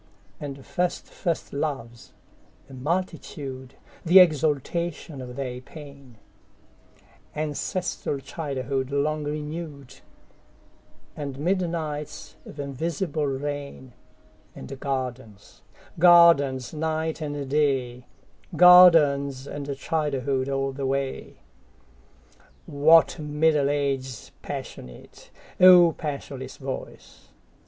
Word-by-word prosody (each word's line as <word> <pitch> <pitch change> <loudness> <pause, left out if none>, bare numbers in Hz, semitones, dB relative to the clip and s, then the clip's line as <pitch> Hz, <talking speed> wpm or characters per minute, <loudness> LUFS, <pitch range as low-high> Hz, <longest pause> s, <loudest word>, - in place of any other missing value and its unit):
And 140 -2 -8
first 180 -1 -2
first 170 -2 -4
loves, 135 -5 -5 0.6
a 135 - -14
multitude, 135 -3 -4 0.3
The 180 +1 +5
exaltation 155 -1 +1
of 125 -1 -8
their 125 -2 -5
pain; 140 -4 -13 1.2
Ancestral 155 +1 -3
childhood 135 -2 -4
long 150 +2 -1
renewed; 150 -2 -6 1.2
And 140 -3 -6
midnights 165 -3 -3
of 145 - -11
invisible 150 +2 -3
rain; 140 -2 -5 0.6
And 65 - -9
gardens, 130 -7 -5 0.4
gardens, 165 -7 +5
night 160 +1 -2
and 145 -2 -4
day, 130 -4 0 0.5
Gardens 150 -7 +6
and 140 -1 -5
childhood 140 -3 -1
all 135 0 -1
the 135 0 -4
way. 135 0 -4 1.2
What 160 +4 +4
Middle 150 -1 +1
Ages 135 -4 -3
passionate,O 175 - +2
passionless 140 -4 -6
voice! 135 -1 -8
145 Hz, 80 wpm, -25 LUFS, 135-160 Hz, 1.2 s, Gardens